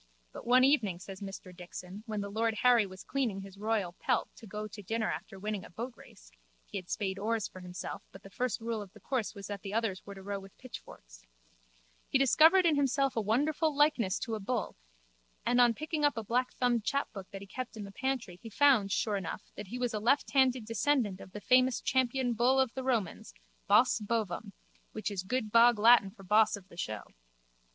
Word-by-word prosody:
But -, -, -10 dB
one 250 Hz, +1 st, +6 dB
evening, 235 Hz, -10 st, +3 dB
says 190 Hz, +1 st, -10 dB
Mr 195 Hz, -2 st, -8 dB
Dixon, 180 Hz, +2 st, -9 dB
when 215 Hz, -2 st, -2 dB
the 200 Hz, 0 st, -5 dB
lord 225 Hz, +1 st, 0 dB
Harry 240 Hz, -4 st, +5 dB
was 185 Hz, 0 st, -11 dB
cleaning 240 Hz, -8 st, -1 dB
his 195 Hz, 0 st, -12 dB
royal 210 Hz, -5 st, -1 dB
pelt 250 Hz, -3 st, 0 dB
to 225 Hz, -, -12 dB
go 210 Hz, +2 st, -5 dB
to 210 Hz, 0 st, -10 dB
dinner 220 Hz, +3 st, -1 dB
after 195 Hz, -, -7 dB
winning 205 Hz, 0 st, -3 dB
a -, -, -11 dB
boatrace 205 Hz, -, -9 dB, 0.3 s
(he 200 Hz, -, -5 dB
had 180 Hz, -, -15 dB
spade 195 Hz, -2 st, -2 dB
oars 220 Hz, +1 st, -1 dB
for 185 Hz, -, -12 dB
himself 180 Hz, 0 st, -6 dB
but 195 Hz, -, -13 dB
the 195 Hz, -, -12 dB
first 250 Hz, +3 st, -1 dB
rule 225 Hz, -1 st, -2 dB
of 200 Hz, -3 st, -10 dB
the -, -, -15 dB
course 250 Hz, -5 st, -2 dB
was 200 Hz, -1 st, -8 dB
that 205 Hz, -2 st, -6 dB
the 200 Hz, +1 st, -5 dB
others 220 Hz, -5 st, -1 dB
were 200 Hz, -, -9 dB
to 195 Hz, -, -11 dB
row 200 Hz, 0 st, -3 dB
with 195 Hz, 0 st, -14 dB
pitchforks) -, -, -12 dB, 0.9 s
he -, -, +3 dB
discovered 320 Hz, +7 st, +6 dB
in 325 Hz, -3 st, +4 dB
himself 275 Hz, -1 st, +1 dB
a 225 Hz, -, +1 dB
wonderful 290 Hz, +8 st, +1 dB
likeness 275 Hz, -10 st, +3 dB
to 230 Hz, -, -4 dB
a 220 Hz, -, -2 dB
bull 215 Hz, +1 st, -2 dB, 0.7 s
and 245 Hz, 0 st, +4 dB
on 240 Hz, -1 st, +6 dB
picking 310 Hz, +2 st, -3 dB
up 290 Hz, -4 st, +3 dB
a 225 Hz, -, -2 dB
blackthumbed 245 Hz, 0 st, 0 dB
chapbook 215 Hz, -7 st, -3 dB
that 195 Hz, -, -8 dB
he -, -, -8 dB
kept 240 Hz, +3 st, -6 dB
in 210 Hz, -, -5 dB
the 200 Hz, -, -8 dB
pantry 245 Hz, -6 st, -3 dB
he 225 Hz, -, -8 dB
found 245 Hz, -5 st, +4 dB
sure 210 Hz, 0 st, +1 dB
enough 180 Hz, -4 st, -6 dB
that 210 Hz, -, -7 dB
he 245 Hz, -, -5 dB
was 245 Hz, -2 st, -1 dB
a 215 Hz, -, -1 dB
lefthanded 260 Hz, 0 st, +2 dB
descendant 230 Hz, -3 st, 0 dB
of 185 Hz, -, -12 dB
the 210 Hz, -, -7 dB
famous 255 Hz, +1 st, +4 dB
champion 260 Hz, -1 st, +1 dB
bull 245 Hz, +4 st, +3 dB
of 260 Hz, -3 st, +2 dB
the 260 Hz, -, -4 dB
Romans, 220 Hz, -, -2 dB, 0.3 s
Bos 250 Hz, -1 st, +5 dB
Bovum, 210 Hz, -2 st, -2 dB, 0.4 s
which 215 Hz, -1 st, -3 dB
is 195 Hz, -3 st, -2 dB
good 215 Hz, +2 st, -2 dB
bog 235 Hz, +1 st, +6 dB
Latin 225 Hz, -2 st, +6 dB
for 195 Hz, 0 st, -15 dB
boss 210 Hz, +4 st, +4 dB
of 195 Hz, -2 st, -13 dB
the -, -, -14 dB
show. 110 Hz, -10 st, -4 dB
220 Hz, 210 wpm, -31 LUFS, 195-255 Hz, 0.9 s, one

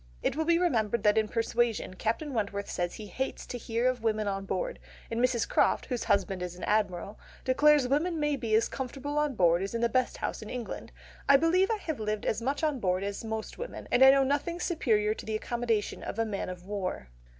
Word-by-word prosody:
It -, -, +1 dB
will 320 Hz, +1 st, 0 dB
be 335 Hz, +1 st, +4 dB
remembered 235 Hz, -, +1 dB
that 210 Hz, -1 st, +5 dB
in 220 Hz, -1 st, +2 dB
Persuasion 230 Hz, -2 st, 0 dB
Captain 230 Hz, +9 st, -2 dB
Wentworth 200 Hz, -3 st, -2 dB
says 175 Hz, -1 st, -2 dB
he 215 Hz, -, -8 dB
hates 260 Hz, +7 st, -4 dB
"to -, -, -6 dB
hear 230 Hz, +2 st, 0 dB
of 255 Hz, -2 st, 0 dB
women 215 Hz, -2 st, 0 dB
on 195 Hz, 0 st, -2 dB
board," -, -, -3 dB, 0.3 s
and 230 Hz, -, -1 dB
Mrs. 250 Hz, -2 st, +2 dB
Croft, -, -, +2 dB
whose 245 Hz, -3 st, -3 dB
husband 195 Hz, -1 st, +1 dB
is 180 Hz, -1 st, -4 dB
an 180 Hz, -, -10 dB
Admiral, 205 Hz, -1 st, 0 dB, 0.3 s
declares 290 Hz, +1 st, +5 dB
"women 320 Hz, +5 st, +1 dB
may 295 Hz, -1 st, +1 dB
be 230 Hz, -5 st, 0 dB
as 225 Hz, -, +3 dB
comfortable 275 Hz, +3 st, -3 dB
on 300 Hz, -3 st, 0 dB
board 175 Hz, -2 st, +4 dB
as 195 Hz, +4 st, -3 dB
in 230 Hz, -, -1 dB
the 235 Hz, -, +4 dB
best 255 Hz, +1 st, +1 dB
house -, -, -3 dB
in 215 Hz, -, -8 dB
England. 245 Hz, -3 st, -6 dB, 0.4 s
I 280 Hz, -, +9 dB
believe 350 Hz, +6 st, +3 dB
I 445 Hz, -, +1 dB
have 315 Hz, -, -4 dB
lived 215 Hz, -1 st, -2 dB
as 220 Hz, -, 0 dB
much 275 Hz, +6 st, -1 dB
on 300 Hz, -4 st, +1 dB
board 185 Hz, -2 st, 0 dB
as 200 Hz, +2 st, -4 dB
most 220 Hz, -1 st, -5 dB
women -, -, -6 dB
and 245 Hz, -, +5 dB
I 265 Hz, -, +10 dB
know 275 Hz, 0 st, +6 dB
nothing 290 Hz, +6 st, -1 dB
superior 220 Hz, -, +1 dB
to -, -, -9 dB
the 220 Hz, -, -3 dB
accommodation 230 Hz, -1 st, -1 dB
of -, -, -5 dB
a 225 Hz, -, +1 dB
man 200 Hz, -3 st, -3 dB
of 180 Hz, -1 st, -8 dB
war." 190 Hz, -, -4 dB
230 Hz, 230 wpm, -29 LUFS, 210-275 Hz, 0.4 s, I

